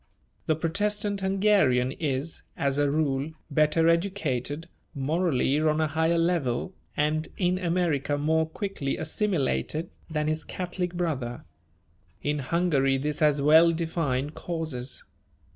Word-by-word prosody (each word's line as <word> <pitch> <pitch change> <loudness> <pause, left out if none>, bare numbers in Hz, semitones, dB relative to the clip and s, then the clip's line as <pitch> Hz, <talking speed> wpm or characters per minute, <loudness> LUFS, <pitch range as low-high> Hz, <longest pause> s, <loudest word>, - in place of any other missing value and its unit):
The 155 - +3
Protestant 205 +5 -1
Hungarian 190 -10 +3
is, 145 +1 -3 0.2
as 140 0 0
a 145 -1 +3
rule, 145 0 0 0.2
better 155 +3 +3
educated, 165 -5 0 0.3
morally 145 -1 +1
on 155 0 +2
a 160 - +3
higher 160 +2 +1
level, 165 -3 0 0.2
and 155 +1 +1
in 180 -1 +1
America 165 -5 0
more 160 +2 +1
quickly 195 -7 -3
assimilated, 160 - -1 0.2
than 150 -1 -1
his 155 +1 -1
Catholic 180 -1 -4
brother. 140 -9 -2 0.8
In 145 +1 0
Hungary 140 -2 +2
this 150 +2 -2
has 150 -2 +3
well 160 +3 +7
defined 160 -4 -1
causes. 155 -8 -4
155 Hz, 120 wpm, -27 LUFS, 140-170 Hz, 0.8 s, well